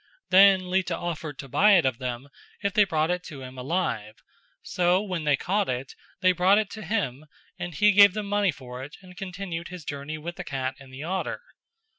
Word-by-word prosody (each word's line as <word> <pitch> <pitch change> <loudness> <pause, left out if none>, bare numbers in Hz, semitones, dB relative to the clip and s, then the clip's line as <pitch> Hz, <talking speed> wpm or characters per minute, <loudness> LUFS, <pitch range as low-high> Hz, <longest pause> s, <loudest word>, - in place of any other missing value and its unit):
Then 190 -1 +6
Lita 185 -2 0
offered 160 -4 -5
to 135 - -8
buy 205 +10 +5
it 175 -6 +5
of 130 -3 0
them 125 +1 -4 0.4
if 200 -1 0
they 210 -1 +5
brought 160 -2 0
it 180 0 -1
to 140 -3 -9
him 130 0 -9
alive; 125 - -2 0.5
so 180 +1 +2
when 185 -6 -4
they 145 -2 +3
caught 200 +6 0
it 130 +1 -3 0.3
they 185 -1 +5
brought 185 +3 +4
it 215 -2 0
to 220 - -8
him 160 - -2 0.3
and 175 -2 -5
he 210 +7 +5
gave 200 -1 +7
them 215 -1 -3
money 205 -1 +2
for 125 -2 -9
it 145 +4 -10
and 180 -1 -14
continued 180 -2 -5
his 175 -3 -9
journey 145 +2 -5
with 170 +3 -7
the - - -5
cat 135 -1 -3
and 135 -1 -14
the 135 +3 -8
otter. 185 +3 -3
175 Hz, 210 wpm, -26 LUFS, 140-190 Hz, 0.5 s, gave